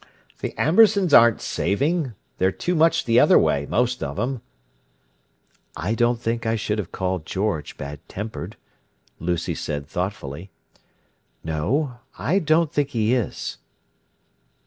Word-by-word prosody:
"The -, -, -5 dB
Ambersons 195 Hz, 0 st, +4 dB
aren't 115 Hz, -3 st, +7 dB
saving. 140 Hz, -, 0 dB, 0.3 s
They're 95 Hz, +1 st, +3 dB
too 135 Hz, -, -2 dB
much 165 Hz, 0 st, +3 dB
the 115 Hz, 0 st, +4 dB
other -, -, +6 dB
way, 70 Hz, 0 st, +2 dB
most 125 Hz, +1 st, 0 dB
of 70 Hz, 0 st, -3 dB
them." 125 Hz, -, -2 dB, 1.4 s
"I 90 Hz, +8 st, -1 dB
don't 120 Hz, 0 st, +2 dB
think 115 Hz, 0 st, -2 dB
I 115 Hz, 0 st, 0 dB
should 110 Hz, -1 st, -2 dB
have 95 Hz, -3 st, -5 dB
called 95 Hz, -3 st, -2 dB
George 95 Hz, -4 st, -2 dB
bad 70 Hz, +1 st, -6 dB
tempered," 105 Hz, -1 st, -6 dB, 0.6 s
Lucy 85 Hz, 0 st, -1 dB
said 70 Hz, -1 st, -4 dB
thoughtfully. 90 Hz, -1 st, -5 dB, 0.9 s
"No. 120 Hz, -, -1 dB, 0.2 s
I 155 Hz, -, +1 dB
don't 160 Hz, -2 st, +2 dB
think 145 Hz, -1 st, +1 dB
he 115 Hz, -3 st, +1 dB
is." 125 Hz, -4 st, -2 dB
115 Hz, 130 wpm, -23 LUFS, 90-140 Hz, 1.4 s, aren't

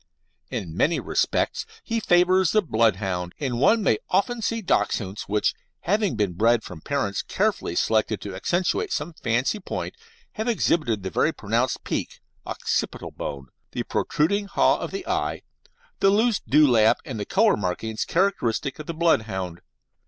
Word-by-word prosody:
In 80 Hz, -4 st, -5 dB
many 160 Hz, -, +2 dB
respects -, -, 0 dB, 0.2 s
he 230 Hz, -1 st, -1 dB
favours 180 Hz, -2 st, +3 dB
the 215 Hz, -1 st, +4 dB
Bloodhound, 95 Hz, -, 0 dB
and 130 Hz, -5 st, -2 dB
one 215 Hz, -, +4 dB
may 110 Hz, -, +2 dB
often 230 Hz, +5 st, +1 dB
see 230 Hz, +1 st, -1 dB
Dachshunds 100 Hz, -, -1 dB
which, 105 Hz, 0 st, +1 dB, 0.3 s
having 205 Hz, -, +1 dB
been 105 Hz, -4 st, 0 dB
bred 115 Hz, +4 st, +3 dB
from 85 Hz, -4 st, -9 dB
parents 100 Hz, -, -1 dB
carefully 85 Hz, -, -1 dB
selected 110 Hz, 0 st, +1 dB
to 100 Hz, -1 st, -6 dB
accentuate 185 Hz, -, 0 dB
some 165 Hz, +3 st, -2 dB
fancy 130 Hz, -, 0 dB
point, 195 Hz, -, -5 dB, 0.4 s
have 220 Hz, +2 st, -4 dB
exhibited 155 Hz, -, +1 dB
the 95 Hz, -, -4 dB
very -, -, +2 dB
pronounced -, -, -1 dB
"peak" -, -, -3 dB, 0.3 s
(occipital -, -, -2 dB
bone), 70 Hz, -2 st, -6 dB, 0.2 s
the -, -, -2 dB
protruding 200 Hz, +7 st, 0 dB
haw -, -, +3 dB
of -, -, -4 dB
the 390 Hz, -1 st, -5 dB
eye, -, -, -1 dB, 0.6 s
the 195 Hz, -, +5 dB
loose 215 Hz, +2 st, +3 dB
dewlap 120 Hz, -4 st, +4 dB
and 110 Hz, -, -5 dB
the -, -, -1 dB
colour 210 Hz, +3 st, +3 dB
markings 105 Hz, +3 st, -2 dB
characteristic 155 Hz, -, 0 dB
of 150 Hz, -, -8 dB
the 170 Hz, -, -4 dB
Bloodhound. 105 Hz, -, 0 dB
140 Hz, 150 wpm, -24 LUFS, -, 0.6 s, the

